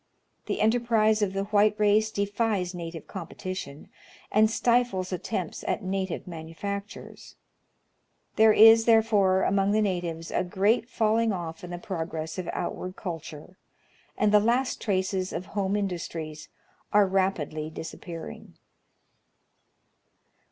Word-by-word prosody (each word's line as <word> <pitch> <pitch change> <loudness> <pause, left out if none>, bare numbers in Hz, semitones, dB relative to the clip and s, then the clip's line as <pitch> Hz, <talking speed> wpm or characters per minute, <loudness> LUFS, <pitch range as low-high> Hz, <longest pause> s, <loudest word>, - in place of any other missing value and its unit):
The - - -2
enterprise 220 -1 +3
of 195 -2 0
the 195 0 -1
white 210 +1 +3
race 210 +1 +3
defies 200 -2 -1
native 165 -2 -7
competition, 170 -4 -7 0.4
and 215 +1 +4
stifles 230 -6 +1
attempts 180 -2 -4
at - - -1
native 190 -1 -3
manufactures: 185 +5 -7 1.0
there 220 0 +6
is 225 +1 +7
therefore 210 -5 +4
among 200 +1 +2
the 215 - +3
natives 175 -4 -3
a - - +1
great 210 +6 +1
falling 225 0 +2
oif 170 -5 -4
in 180 - -7
the 175 - -5
progress 165 -2 -5
of 180 - -4
outward 185 0 -4
culture, 165 -1 -8 0.6
and 210 -1 +2
the 210 - +7
last 240 +4 0
traces 190 -2 -1
of 180 - -4
home 200 -1 0
industries 165 -6 -4 0.4
are 205 0 +5
rapidly 185 -5 -1
disappearing. 165 - -9
195 Hz, 120 wpm, -27 LUFS, 175-215 Hz, 1.0 s, is